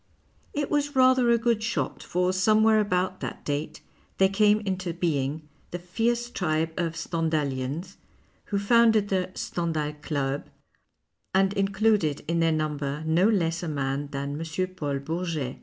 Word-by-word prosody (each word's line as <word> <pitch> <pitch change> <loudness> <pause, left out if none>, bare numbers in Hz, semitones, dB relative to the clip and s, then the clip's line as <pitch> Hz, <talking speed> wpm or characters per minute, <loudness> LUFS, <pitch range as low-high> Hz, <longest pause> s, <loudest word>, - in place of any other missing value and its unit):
It 290 -1 -2
was 290 -1 0
rather 255 -1 +5
a 235 - +5
good 230 -1 +1
shot, 225 +1 -2
for 180 +1 0
somewhere 215 +3 +4
about 185 -2 0
that - - -6
date 150 +2 -3 0.4
there 190 0 +4
came 210 +1 +4
intobeing 170 -7 -2 0.3
the 175 - -4
fierce 235 +7 -1
tribe 160 -4 0
of 165 -2 -2
Stendhalians, 155 0 -2 0.5
who 200 - -2
founded 220 0 +4
the 185 -2 0
" - - -27
Stendhal 160 -3 -2
Club 140 -2 -2 0.4
" - - -17
and 195 +1 +3
included 195 -5 +1
in 170 +1 0
their 165 0 +3
numl^er 150 -1 -2
no 170 +6 +3
less 170 -6 +1
a 175 - -4
man 140 -1 -2
than 140 +1 -4
M. 165 +3 -2
Paul 145 -5 -2
Bourget. 155 -2 -3
175 Hz, 150 wpm, -26 LUFS, 155-205 Hz, 0.5 s, rather